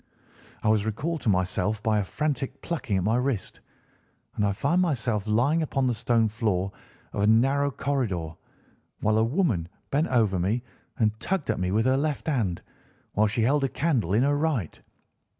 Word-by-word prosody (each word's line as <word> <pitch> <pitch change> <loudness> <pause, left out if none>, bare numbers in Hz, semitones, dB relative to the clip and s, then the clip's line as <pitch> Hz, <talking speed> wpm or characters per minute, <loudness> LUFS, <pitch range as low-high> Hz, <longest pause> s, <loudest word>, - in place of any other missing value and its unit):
"I - - 0
was 110 -1 +3
recalled 155 +9 -2
to 120 - 0
myself 95 +3 0
by 110 -1 +2
a - - +1
frantic 140 +4 -3
plucking 150 - -2
at 95 - 0
my 110 +4 +2
wrist, 125 -5 -2 0.8
and 105 - 0
I 100 - +2
found 145 - +1
myself 120 - 0
lying 130 +10 +2
upon 135 -4 0
the 125 - +2
stone 115 0 +2
floor 105 -4 -1 0.4
of 100 - -2
a 105 - +3
narrow 135 +6 +3
corridor, 120 - -2 0.7
while 110 +1 +2
a - - +4
woman 115 - 0 0.2
bent 150 +4 +2
over 110 -7 +2
me 105 +8 0 0.3
and 110 -1 +1
tugged 190 -6 -1
at - - -3
me 90 0 0
with 110 +4 +1
her 130 +1 +3
left 150 0 -1
hand, 115 - -1 0.5
while 110 +1 +3
she 110 +2 0
held 140 +4 +2
a 135 - +1
candle 130 - 0
in 120 - +4
her 145 +1 +2
right. 145 - -1
115 Hz, 185 wpm, -26 LUFS, 105-140 Hz, 0.8 s, a